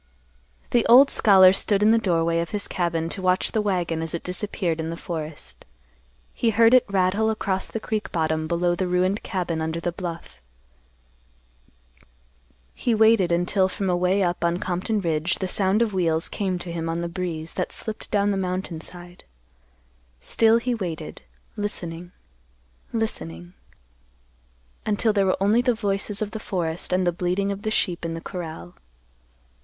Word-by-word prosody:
The 240 -2 +3
old 265 +4 +8
scholar 190 -3 +6
stood 200 +1 +1
in 215 - +6
the 230 - +4
doorway 170 -4 +1
of 170 - -2
his 205 -1 -3
cabin 170 -2 -1
to 190 - -3
watch 185 0 +1
the 220 - +1
wagon 175 -5 -1
as 165 0 -1
it 170 - -5
disappeared 180 -2 -1
in 160 0 -3
the 165 - -5
forest. 155 - -7 0.7
He 230 - +1
heard 225 +2 +5
it 255 - +5
rattle 200 +3 +2
across 195 -3 -1
the 225 - -4
creek 215 -1 -3
bottom 160 -1 -1
below 175 +1 +1
the 180 +1 -1
ruined 185 +3 +1
cabin 175 -5 -3
under 160 +1 -2
the 175 +1 -2
bluff. 165 - -7 2.3
He 235 -3 0
waited 220 -5 +4
until 185 +2 +2
from 190 0 -2
away 180 +2 +2
up 175 -1 -1
on 170 0 +1
Compton 190 +4 -1
Ridge 165 0 0
the 190 - -3
sound 195 +4 +2
of 220 -3 -3
wheels 165 -3 +1
came 190 -3 -2
to 175 0 -6
him 165 -1 -3
on 165 +1 -2
the 170 - -2
breeze 170 -2 -4
that 180 - -3
slipped 220 -1 -5
down 205 0 +2
the 195 - -1
mountain 185 -3 -3
side. 175 +1 -11 1.0
Still 225 - +3
he 245 +1 -1
waited, 170 -8 -5 0.3
listening, 175 -5 -5 0.8
listening, 85 - -4 1.3
until 215 +1 +1
there 200 -2 +2
were 185 - +2
only 210 +5 +3
the 245 -1 +1
voices 205 -1 -1
of 210 - -6
the 220 - -5
forest 175 -5 -3
and 180 0 +2
the 175 - +3
bleating 180 +3 -1
of 200 0 -5
the 215 - -2
sheep 180 -5 -1
in 165 0 -3
the - - -5
corral. 160 - -7
185 Hz, 170 wpm, -24 LUFS, 170-205 Hz, 2.3 s, old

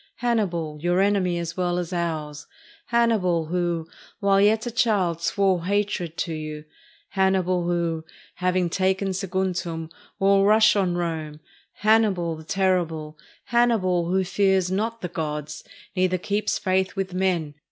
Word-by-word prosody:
— - - -53
Hannibal, 170 -10 0
your 175 +2 +1
enemy 195 -3 +2
as 170 -1 -4
well 180 -1 0
as 180 0 -3
ours; 155 -4 -3 0.4
Hannibal, 215 -9 +2
who, 170 -1 -1 0.3
while 200 -2 +3
yet 215 +2 +3
a 240 - -3
child, 195 -8 +1
swore 190 -1 +1
hatred 195 -4 -1
to 165 - -2
you; 155 -1 -6 0.4
Hannibal, 185 -2 +1
who, 170 -2 -1 0.3
having 180 -1 +1
taken 190 +2 0
Saguntum, 180 -4 -2 0.3
will 195 0 +4
rush 215 +1 +5
on 185 -3 +1
Rome; 160 -3 -3 0.5
Hannibal, 205 -7 +3
the 160 - -11
terrible; 165 -4 0 0.3
Hannibal, 195 -8 +2
who 190 +1 +2
fears 190 -1 +1
not 225 +4 -2
the 180 - -2
gods, 150 -4 -5 0.3
neither 185 0 +2
keeps 205 +4 -1
faith 190 0 0
with 190 -2 -3
men. 180 -5 0
185 Hz, 140 wpm, -24 LUFS, 170-195 Hz, 0.5 s, rush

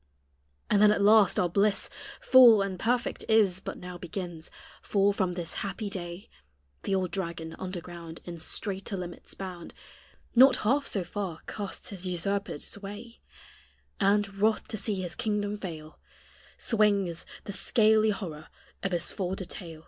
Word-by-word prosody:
And 205 - +3
then 210 - +8
at 200 - +1
last 210 -2 +6
our 180 - +3
bliss 200 +3 +2 0.3
Full 240 -6 +8
and 190 -2 -4
perfect 240 +3 0
is 205 -5 +4
But - - -6
now 180 -1 -8
begins: 175 -2 -6 0.3
for 200 0 +2
from 185 -3 -1
this 170 -2 -4
happy 200 +1 -4
day 175 0 -6 0.5
The 195 - 0
old 185 -2 -1
dragon, 170 -4 -4
under 185 -1 -4
ground 170 -1 -9
In 170 -1 -7
straiter 195 +4 -4
limits 175 -1 -6
bound, 180 -3 -8 0.6
Not 260 +2 +8
half 275 +6 +2
so 195 - 0
far 180 -2 -5
casts 200 -2 -4
his 190 -2 -4
usurpèd 195 -1 -1
sway, 205 +4 -7 0.8
And, 200 -1 +2
wroth 215 +1 +2
to - - -3
see 195 -2 -2
his 175 - -4
kingdom 210 -1 -1
fail, 160 -5 -8 0.6
Swinges 200 -6 +1 0.2
the 200 - -6
scaly 220 +1 +3
horror 170 -7 -4 0.3
of 195 -2 -2
his 170 -1 0
folded 190 -1 -4
tail. 165 -4 -8
195 Hz, 150 wpm, -28 LUFS, 175-210 Hz, 0.8 s, then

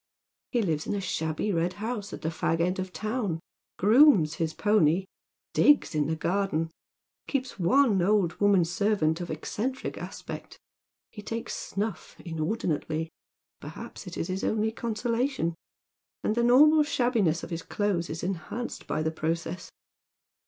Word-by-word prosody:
He 240 - +1
hves 160 -5 -1
in - - -1
a - - -1
shabby 160 +1 -1
red 170 +1 0
house 210 0 -4
at - - -8
the 160 - 0
fag 165 0 -1
end 180 +2 +1
of 185 - -2
the - - -22
town, 215 -6 -2 0.4
grooms 210 - +6
his 160 -1 +1
pony, 190 -2 +3 0.5
digs 295 -10 +4
in 150 -2 +1
the 160 - 0
garden, 165 -1 0 0.6
keeps 260 -5 -2
one 200 +2 +4
old 190 -2 +3
woman 200 -4 +5
servant 175 -2 +1
of 175 - -5
eccentric 225 +11 -3
aspect; - - -8 0.5
he 210 - -9
takes 225 +2 -4
snulf 205 +2 -4
in 165 -3 -6
ordinately 160 -3 -1 0.2
— - - -54
perhaps - - -9
it - - -7
is - - -2
his 185 +1 -3
only 220 0 +1
consolation 230 - -1 0.4
— - - -65
and - - +1
the 235 - +1
normal 300 +6 +7
(shabbiness 240 - +1
of - - -7
his 165 0 -3
clothes 195 -4 -1
is 160 +1 -5
enhanced 195 +7 -4
by 155 - -1
the 160 - 0
process. 165 +2 -3
190 Hz, 160 wpm, -28 LUFS, 165-225 Hz, 0.6 s, normal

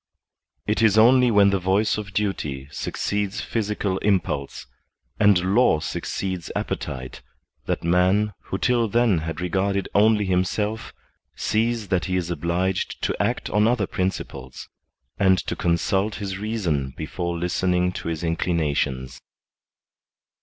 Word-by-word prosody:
It 105 +2 0
is 110 -2 +4
only 125 +3 +6
when 100 -3 +5
the 100 - +1
voice 95 +4 +2
of 105 -1 -6
duty 75 -10 -2
succeeds 100 +5 -2
physical 105 -3 -2
impulse, 90 -9 -1 0.5
and 95 -3 +4
law 120 -9 +4
succeeds 90 +2 -4
appetite, 65 -1 -4 0.5
that - - -1
man, 90 +5 +2
who - - -3
till 120 -2 +2
then 115 -4 +2
had 80 0 -5
regarded 95 +2 0
only 105 0 +4
himself, 105 +4 -1 0.4
sees 110 -2 0
that 90 -4 +1
he 90 - -1
is 90 -2 -1
obliged 85 +3 -1
to - - -1
act - - -1
on 105 +2 +3
other 115 -4 +2
principles, 70 -9 -4 0.5
and 95 -1 +5
to - - -3
consult 95 +5 0
his 100 -2 -4
reason 85 - -2
before 85 +2 -3
listen 90 +2 0
ing 90 0 +2
to - - -6
his 80 0 -3
inclinations. 70 -6 -1
95 Hz, 130 wpm, -23 LUFS, 85-105 Hz, 0.5 s, only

